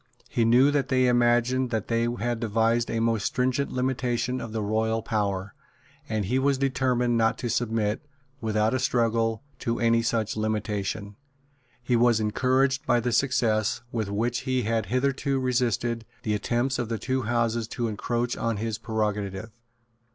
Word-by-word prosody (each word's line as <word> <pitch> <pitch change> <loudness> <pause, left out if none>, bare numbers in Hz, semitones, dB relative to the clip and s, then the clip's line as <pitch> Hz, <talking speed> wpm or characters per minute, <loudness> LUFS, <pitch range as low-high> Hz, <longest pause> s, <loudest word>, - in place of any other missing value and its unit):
He 115 - +2
knew 125 +5 +5
that 145 -2 +1
they 130 -1 +3
imagined 120 +1 +3
that 110 -3 -2
they 115 0 +1
had 120 +1 -1
devised 115 +1 +1
a 115 - -1
most 115 -2 +1
stringent 130 +2 0
limitation 125 -1 -1
of 115 - -6
the 110 -1 -2
royal 110 +1 0
power; 100 -3 -2 0.6
and 110 -2 -1
he 125 +7 +1
was 140 0 +2
determined 125 -3 +1
not 115 0 +2
to 120 -2 -3
submit, 110 -3 0 0.4
without 110 0 +1
a 130 - +1
struggle, 115 -2 +1 0.2
to 115 -2 -2
any 115 0 +3
such 115 -2 -1
limitation. 105 -2 -2 0.7
He 120 0 +1
was 120 -1 +4
encouraged 130 +5 +1
by 120 - +4
the 120 +1 -1
success 115 -4 +1
with 110 -4 -2
which 115 +4 -1
he 130 -1 -1
had 110 +1 0
hitherto 135 +2 0
resisted 120 -2 0 0.2
the 105 - 0
attempts 120 +5 0
of 120 -2 -2
the 115 - -1
two 130 +3 -1
Houses 115 -1 0
to 120 0 -2
encroach 120 +3 -2
on 115 -2 -1
his 110 0 -3
prerogative. 105 -1 -2
115 Hz, 160 wpm, -26 LUFS, 110-125 Hz, 0.7 s, knew